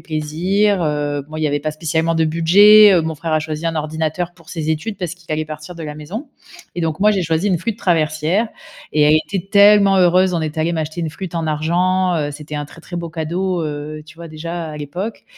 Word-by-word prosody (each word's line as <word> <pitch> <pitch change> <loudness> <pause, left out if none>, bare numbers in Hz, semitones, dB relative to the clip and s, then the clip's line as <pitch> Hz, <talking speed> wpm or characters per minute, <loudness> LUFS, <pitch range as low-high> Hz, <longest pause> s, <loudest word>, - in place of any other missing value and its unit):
plaisir», 175 +6 0
heu, 145 -2 -1
bon, 155 - -12
il 155 - -3
y - - +2
avait 145 0 -1
pas 155 +1 -2
spécialement 160 +1 -1
de 160 0 +2
budget, 200 +6 +7
heu, 170 - +3
mon 160 0 -3
frère 160 +2 -4
a 155 - +2
choisi 155 +1 -4
un 165 - -1
ordinateur 160 +3 -2
pour 165 -2 -21
ses 160 -2 -3
études 180 +7 -3
parce 175 -2 -4
qu'il 175 -3 -18
allait 155 0 -1
partir 155 +3 -8
de 165 - -8
la 150 -1 -6
maison 190 - -7 0.5
et 175 - -2
donc 160 0 -2
moi, 210 +1 +5
j'ai 190 -3 0
choisi 165 +5 0
une 180 -3 +1
flûte 225 +2 -4
traversière 165 +5 +1 0.4
et 150 - +3
elle 150 +1 +5
était 195 -1 -4
tellement 200 -1 +6
heureuse. 185 +1 +4
On 165 - 0
est 155 +1 -4
allé 165 +2 0
m'acheter 160 +1 -3
une 160 -2 -2
flûte 180 +1 -8
en 165 -1 -2
argent, 180 +4 +1
heu, 145 -1 -1
c'était 150 +1 -9
un 145 - -3
très, 165 - -15
très 175 +2 -8
beau 170 -1 -5
cadeau, 170 +2 -2
heu, 150 +1 -5
tu 155 - -14
vois, 170 -1 -9
déjà 165 +2 -5
à 150 - -8
l'époque 175 +10 -6
165 Hz, 240 wpm, -19 LUFS, 155-180 Hz, 0.5 s, budget